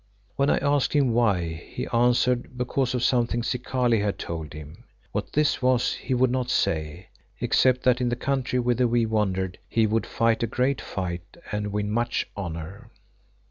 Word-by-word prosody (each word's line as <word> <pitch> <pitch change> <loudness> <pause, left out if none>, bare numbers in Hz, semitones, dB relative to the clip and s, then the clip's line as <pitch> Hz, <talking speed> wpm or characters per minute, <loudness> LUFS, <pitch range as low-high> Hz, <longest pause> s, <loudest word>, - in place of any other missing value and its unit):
When 140 +1 +2
I - - +3
asked 145 -1 +1
him 135 -5 +3
why, 100 -8 +2 0.2
he 125 - -5
answered 125 +1 +2
because 125 +1 0
of 125 - -1
something 120 -2 +1
Zikali 125 -1 0
had 100 -1 -1
told 80 -3 -5
him. 75 0 -10 0.3
What - - -4
this 150 -1 +2
was 125 -1 +2
he 130 - -2
would 125 0 +3
not 125 -1 -1
say, 80 0 -1 0.3
except 130 -1 +3
that 125 0 +3
in 125 - +1
the 120 - 0
country 130 0 -1
whither 125 0 +2
we 120 0 +2
wandered 95 -4 -1
he 115 -1 +3
would 110 +1 0
fight 115 -1 +1
a 115 - +1
great 130 +3 0
fight 90 - -5
and 105 -1 -2
win 105 0 -2
much 120 +2 0
honour. 95 +4 -6
120 Hz, 175 wpm, -25 LUFS, 100-125 Hz, 0.3 s, I